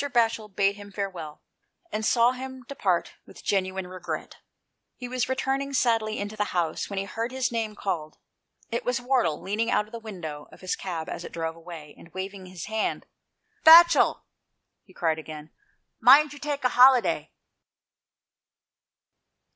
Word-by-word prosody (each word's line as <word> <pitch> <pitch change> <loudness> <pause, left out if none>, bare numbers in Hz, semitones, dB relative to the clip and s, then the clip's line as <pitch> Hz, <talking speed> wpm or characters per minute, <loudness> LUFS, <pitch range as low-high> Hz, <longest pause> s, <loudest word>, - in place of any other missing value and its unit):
Batchel 225 -3 +1
bade 200 +1 +1
him 205 0 -11
farewell, 185 -7 -6 0.5
and 215 - -2
saw 235 +2 +4
him 260 0 -8
depart 190 -11 -1
with - - -14
genuine 190 -1 -1
regret; 185 0 -6 0.6
he 250 - -7
was 250 0 -2
returning 270 +1 -1
sadly 225 -4 +1
into 205 +1 -4
the 210 -1 0
house 165 -2 -1
when 200 - -5
he 195 - -1
heard 225 +5 -4
his 260 0 -1
name 225 -2 -2
called. 165 -7 -4 0.5
It 235 - -2
was 245 0 0
Wardle, 245 - +1
leaning 215 +4 -1
out 210 - +2
of 215 - -20
the 230 - -6
window 175 -9 -7
of - - -16
his 185 0 -2
cab 170 -4 -5
as - - -6
it - - -8
drove 165 -1 -3
away, 165 -3 -10
and 165 - -15
waving 190 0 -6
his 180 -3 -8
hand, 220 0 -2 0.6
"Batchel," 335 0 +8 0.6
he - - -22
cried 160 -2 0
again, 155 -1 -9 0.5
"mind 285 +5 +7
you 290 - -11
take 290 -2 -3
a 250 - +3
holiday." 250 0 +5
210 Hz, 160 wpm, -26 LUFS, 180-250 Hz, 0.6 s, Batchel